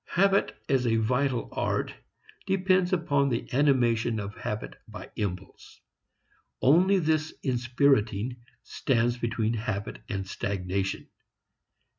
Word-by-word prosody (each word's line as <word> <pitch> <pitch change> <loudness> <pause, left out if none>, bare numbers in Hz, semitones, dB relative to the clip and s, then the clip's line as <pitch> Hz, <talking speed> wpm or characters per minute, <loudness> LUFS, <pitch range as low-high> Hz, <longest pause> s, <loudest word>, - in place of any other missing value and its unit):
Habit 195 +2 +2
as 130 -3 +2
a 115 - +3
vital 125 +3 +1
art - - -1 0.5
depends 185 -1 +2
upon 145 -6 +2
the 115 -2 -2
animation 120 -5 +2
of 100 0 -5
habit 80 - -5
by - - -10
impulse; 95 -2 -6 0.8
only 180 +8 +5
this 155 -2 +1
inspiriting 120 -3 +1 0.3
stands 120 -2 0
between 115 -1 -1
habit 110 -2 -4
and 95 -2 -3
stagnation. 95 0 -3
120 Hz, 105 wpm, -27 LUFS, 110-145 Hz, 0.8 s, only